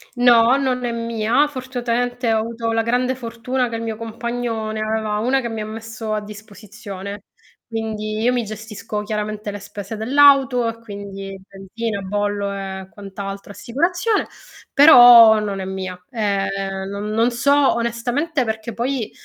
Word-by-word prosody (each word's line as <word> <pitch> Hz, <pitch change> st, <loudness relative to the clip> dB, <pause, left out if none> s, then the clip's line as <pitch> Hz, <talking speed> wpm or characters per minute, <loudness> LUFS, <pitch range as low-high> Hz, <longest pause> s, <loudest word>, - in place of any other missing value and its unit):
No, 245 Hz, +1 st, +5 dB
non 255 Hz, -2 st, -1 dB
è 235 Hz, -, -1 dB
mia, 230 Hz, +4 st, +1 dB
fortunatamente 245 Hz, -3 st, -2 dB
ho 220 Hz, -, +2 dB
avuto 230 Hz, 0 st, -3 dB
la 225 Hz, 0 st, +1 dB
grande 250 Hz, +3 st, 0 dB
fortuna 245 Hz, +1 st, -3 dB
che 230 Hz, -, -5 dB
il 225 Hz, -, -4 dB
mio 225 Hz, -1 st, -3 dB
compagno 230 Hz, 0 st, -4 dB
ne 220 Hz, -, -4 dB
aveva 215 Hz, -1 st, -1 dB
1 255 Hz, +5 st, +2 dB
che 235 Hz, -2 st, -4 dB
mi 225 Hz, -1 st, -4 dB
ha -, -, -4 dB
messo 225 Hz, 0 st, -6 dB
a 215 Hz, -, 0 dB
disposizione, 205 Hz, -1 st, -9 dB, 0.4 s
quindi 215 Hz, -1 st, -4 dB
io 240 Hz, +3 st, +2 dB
mi 245 Hz, -1 st, 0 dB
gestisco 215 Hz, 0 st, -6 dB
chiaramente 210 Hz, 0 st, -4 dB
le 205 Hz, -, -7 dB
spese 205 Hz, +1 st, -8 dB
dell'auto 265 Hz, 0 st, +4 dB
e 230 Hz, 0 st, -4 dB
quindi 200 Hz, -3 st, -8 dB
benzina, 200 Hz, +2 st, -5 dB
bollo 205 Hz, +1 st, -2 dB
e 190 Hz, -1 st, -6 dB
quant'altro, 200 Hz, 0 st, -8 dB
assicurazione, 350 Hz, -, 0 dB, 0.5 s
però 240 Hz, -6 st, +9 dB
non 200 Hz, -2 st, -3 dB
è 190 Hz, -, -4 dB
mia. 185 Hz, -1 st, -5 dB
Eh 205 Hz, -5 st, -1 dB, 0.4 s
non 200 Hz, +1 st, -5 dB
non 225 Hz, +3 st, +2 dB
so 280 Hz, +3 st, +3 dB
onestamente 245 Hz, +5 st, -1 dB
perché 220 Hz, +1 st, -4 dB
poi, 245 Hz, 0 st, -2 dB
225 Hz, 155 wpm, -20 LUFS, 210-245 Hz, 0.5 s, però